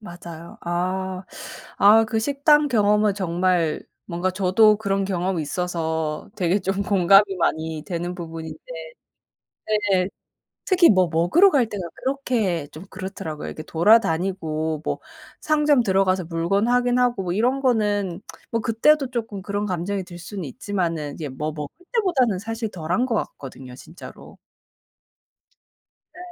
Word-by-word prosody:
맞아요. 170 Hz, -4 st, -10 dB
아. 185 Hz, +2 st, -2 dB, 0.5 s
아 215 Hz, +3 st, +7 dB
그 225 Hz, -1 st, -1 dB
식당 290 Hz, +4 st, +3 dB
경험은 210 Hz, -3 st, +3 dB
정말 175 Hz, -3 st, 0 dB, 0.2 s
뭔가 175 Hz, +1 st, -1 dB
저도 200 Hz, +3 st, +4 dB
그런 195 Hz, -2 st, -1 dB
경험이 185 Hz, -2 st, -1 dB
있어서 160 Hz, +1 st, -3 dB
되게 185 Hz, 0 st, +1 dB
좀 195 Hz, +1 st, -2 dB
공감이 195 Hz, +1 st, +4 dB
많이 160 Hz, -1 st, -1 dB
되는 175 Hz, -1 st, -3 dB
부분인데 160 Hz, -2 st, -7 dB, 1.3 s
네. 185 Hz, 0 st, +2 dB, 0.6 s
특히 365 Hz, -3 st, +5 dB
뭐 185 Hz, -3 st, +3 dB
먹으러 175 Hz, -, +5 dB
갈 265 Hz, -8 st, +2 dB
때가 205 Hz, -3 st, -5 dB, 0.2 s
그렇게 235 Hz, -, -1 dB
좀 160 Hz, +5 st, -10 dB
그렇더라고요. 185 Hz, -5 st, -6 dB
이렇게 155 Hz, -, -7 dB
돌아다니고 165 Hz, -5 st, +1 dB
뭐 -, -, -2 dB, 0.4 s
상점 300 Hz, -3 st, +3 dB
들어가서 190 Hz, -3 st, +1 dB
물건 170 Hz, +6 st, 0 dB
확인하고 245 Hz, -3 st, +2 dB
뭐 175 Hz, -1 st, -2 dB
이런 245 Hz, +6 st, +1 dB
거는 205 Hz, -8 st, 0 dB, 0.3 s
뭐 230 Hz, -1 st, 0 dB
그때도 270 Hz, +6 st, +3 dB
쪼끔 225 Hz, -5 st, -4 dB
그런 205 Hz, +1 st, -3 dB
감정이 190 Hz, +1 st, -2 dB
들 175 Hz, -1 st, -11 dB
수는 190 Hz, +2 st, -7 dB
있지만은 165 Hz, -1 st, -3 dB
이제 155 Hz, -3 st, -5 dB
뭐 150 Hz, +4 st, -4 dB
먹을 150 Hz, -1 st, -6 dB, 0.2 s
때보다는 315 Hz, -, +2 dB
사실 225 Hz, +2 st, -4 dB
덜한 180 Hz, +8 st, -1 dB
것 235 Hz, -, 0 dB
같거든요, 130 Hz, -9 st, -6 dB
진짜로. 165 Hz, +7 st, -13 dB, 1.8 s
네. -, -, -16 dB
190 Hz, 285 characters per minute, -23 LUFS, 170-220 Hz, 1.8 s, 아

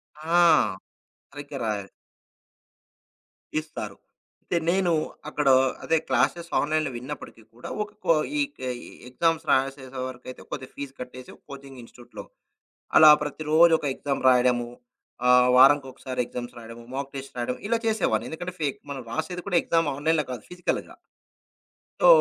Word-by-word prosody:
ఆ! 160 Hz, +3 st, 0 dB, 0.9 s
సరిగ్గా 145 Hz, 0 st, -8 dB
రాయాలి. 100 Hz, -3 st, -3 dB, 1.7 s
ఇస్తారు. 110 Hz, -10 st, -7 dB, 0.5 s
అయితే, 175 Hz, -, -1 dB
నేను 185 Hz, 0 st, +2 dB, 0.4 s
అక్కడొ 145 Hz, -3 st, +3 dB, 0.3 s
అదే 165 Hz, -, +2 dB
క్లాసెస్ 140 Hz, +7 st, +1 dB
ఆన్‌లైన్‌లో 155 Hz, -1 st, 0 dB
విన్నప్పటికి 125 Hz, -2 st, -8 dB
కూడా 120 Hz, -, -9 dB
ఒకకో 210 Hz, -4 st, 0 dB, 0.3 s
ఇక 285 Hz, 0 st, -4 dB, 0.3 s
ఈ -, -, -11 dB, 0.2 s
ఎగ్జామ్స్ 165 Hz, +5 st, 0 dB
రాసేసే 135 Hz, -1 st, -1 dB
వరకైతే 130 Hz, 0 st, -9 dB
కొద్దిగా 130 Hz, -2 st, -6 dB
ఫీజ్ 140 Hz, -1 st, -6 dB
కట్టేసి 125 Hz, 0 st, -9 dB, 0.2 s
కోచింగ్ 135 Hz, -1 st, -10 dB
ఇన్స్టిట్యూట్‌‌లో. 120 Hz, +1 st, -12 dB, 0.7 s
అలా 155 Hz, -1 st, +10 dB
ప్రతిరోజు 155 Hz, +3 st, +3 dB
ఒక 145 Hz, -, -5 dB
ఎగ్జామ్ 140 Hz, 0 st, -3 dB
రాయడము, 125 Hz, -1 st, +3 dB, 0.6 s
ఆహ్, 125 Hz, 0 st, +6 dB
వారం 135 Hz, +3 st, +8 dB
ఒకసారి 130 Hz, -1 st, -5 dB
ఎగ్జామ్స్ 120 Hz, 0 st, -7 dB
రాయడం, 115 Hz, 0 st, -10 dB
మాక్ 140 Hz, 0 st, -4 dB
టెస్ట్ 135 Hz, -1 st, -8 dB
రాయడం 120 Hz, +1 st, -2 dB
ఇలా 230 Hz, 0 st, +2 dB
చేసేవాన్ని. 220 Hz, -4 st, 0 dB
ఎందుకంటే, 175 Hz, +3 st, -6 dB
ఫేక్. 140 Hz, -3 st, -1 dB
మనం 135 Hz, -2 st, -5 dB
రాసేది 180 Hz, +8 st, -4 dB
కూడా 180 Hz, -, +3 dB
ఎగ్జామ్ 165 Hz, -2 st, +1 dB
ఆన్‌లైన్‌లో 155 Hz, +1 st, +1 dB
కాదు 120 Hz, -4 st, -7 dB
ఫిజికల్‌గా. 180 Hz, 0 st, -3 dB, 1.1 s
సో, -, -, +6 dB
140 Hz, 130 wpm, -25 LUFS, 125-160 Hz, 1.7 s, అలా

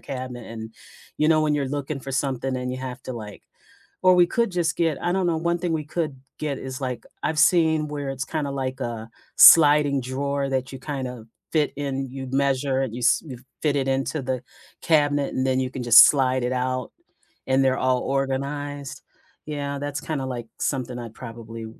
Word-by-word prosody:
cabinet 125 Hz, -3 st, -6 dB
and 110 Hz, -1 st, -8 dB, 0.5 s
you 150 Hz, +1 st, +3 dB
know, 155 Hz, -1 st, +4 dB
when 150 Hz, -1 st, +1 dB
you're 140 Hz, -2 st, -1 dB
looking 145 Hz, 0 st, -4 dB
for 135 Hz, -, -7 dB
something 135 Hz, -1 st, -1 dB
and 125 Hz, 0 st, -3 dB
you 130 Hz, -, -5 dB
have 125 Hz, -1 st, -6 dB
to 130 Hz, -, -5 dB
like 105 Hz, -4 st, -8 dB, 0.6 s
or 185 Hz, -, +7 dB
we 175 Hz, -1 st, +5 dB
could 235 Hz, +2 st, 0 dB
just 170 Hz, -3 st, 0 dB
get, 165 Hz, -4 st, +1 dB
I 175 Hz, -, 0 dB
don't 190 Hz, 0 st, +1 dB
know, 165 Hz, -2 st, +1 dB
one 170 Hz, +1 st, 0 dB
thing 175 Hz, -1 st, -1 dB
we 155 Hz, -1 st, -1 dB
could 155 Hz, -1 st, -3 dB, 0.2 s
get 145 Hz, -3 st, -3 dB
is 130 Hz, -1 st, -6 dB
like, 125 Hz, -3 st, -4 dB, 0.2 s
I've 155 Hz, 0 st, 0 dB
seen 160 Hz, -2 st, +4 dB
where 145 Hz, -2 st, -4 dB
it's 135 Hz, 0 st, -4 dB
kinda 150 Hz, -2 st, -3 dB
like 130 Hz, -2 st, -3 dB
a 115 Hz, -1 st, -4 dB, 0.3 s
sliding 145 Hz, -3 st, +8 dB
drawer 140 Hz, +2 st, -2 dB
that 130 Hz, -1 st, -2 dB
you 135 Hz, -, -8 dB
kind 135 Hz, -1 st, -4 dB
of 120 Hz, -3 st, -9 dB, 0.2 s
fit 155 Hz, -2 st, +1 dB
in, 135 Hz, -2 st, -3 dB
you'd 130 Hz, 0 st, -7 dB
measure 135 Hz, -1 st, +1 dB
it, 125 Hz, -4 st, -4 dB
you 120 Hz, -, -5 dB
s 120 Hz, -, +3 dB
you 130 Hz, -5 st, -8 dB, 0.2 s
fit 150 Hz, -2 st, +1 dB
it 135 Hz, -1 st, 0 dB
into 135 Hz, +3 st, -1 dB
the 130 Hz, -1 st, -3 dB, 0.4 s
cabinet 145 Hz, -3 st, +2 dB
and 130 Hz, -, 0 dB
then 130 Hz, 0 st, +2 dB
you 130 Hz, -1 st, -1 dB
can 130 Hz, -, -5 dB
just 115 Hz, -2 st, +10 dB
slide 130 Hz, -3 st, +2 dB
it 125 Hz, +1 st, 0 dB
out 130 Hz, -1 st, -2 dB, 0.6 s
and 135 Hz, +1 st, +3 dB
they're 130 Hz, 0 st, +2 dB
all 130 Hz, -1 st, +1 dB
organized. 140 Hz, +1 st, -3 dB, 0.4 s
Yeah, 140 Hz, -2 st, -4 dB
that's 145 Hz, 0 st, -3 dB
kinda 150 Hz, -5 st, -3 dB
like 120 Hz, -3 st, -5 dB
something 130 Hz, -3 st, -2 dB
I'd 115 Hz, -2 st, -8 dB
probably 115 Hz, -1 st, -8 dB
135 Hz, 205 wpm, -24 LUFS, 130-150 Hz, 0.6 s, just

